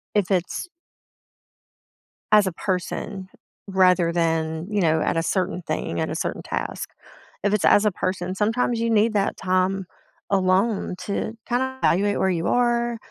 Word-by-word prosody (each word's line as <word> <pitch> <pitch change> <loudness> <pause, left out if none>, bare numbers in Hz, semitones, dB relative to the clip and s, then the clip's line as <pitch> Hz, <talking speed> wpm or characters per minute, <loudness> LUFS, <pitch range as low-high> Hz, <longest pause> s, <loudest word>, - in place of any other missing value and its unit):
if 205 -2 +1
it's 185 - -1 1.7
as 210 -2 +6
a 185 - -1
person 185 +1 -3 0.4
rather 185 -3 +3
than, 160 -1 0
you 205 -1 +1
know, 160 -2 +2
at - - 0
a - - +1
certain 185 0 -1
thing, 85 - -2
at - - -1
a - - -3
certain - - -3
task. - - -4 0.6
If 205 - +2
it's 210 - +1
as 205 - +5
a 210 - +4
person, 185 0 -2
sometimes 225 +3 0
you 230 - 0
need 220 +1 +3
that 200 -2 0
time 185 +1 0 0.5
alone 195 +1 +1
to 210 +2 -2
kinda 260 +2 0
evaluate 205 +3 +2
where 190 - +2
you 170 -1 -1
are, 240 -1 +1
190 Hz, 155 wpm, -23 LUFS, 180-210 Hz, 1.7 s, as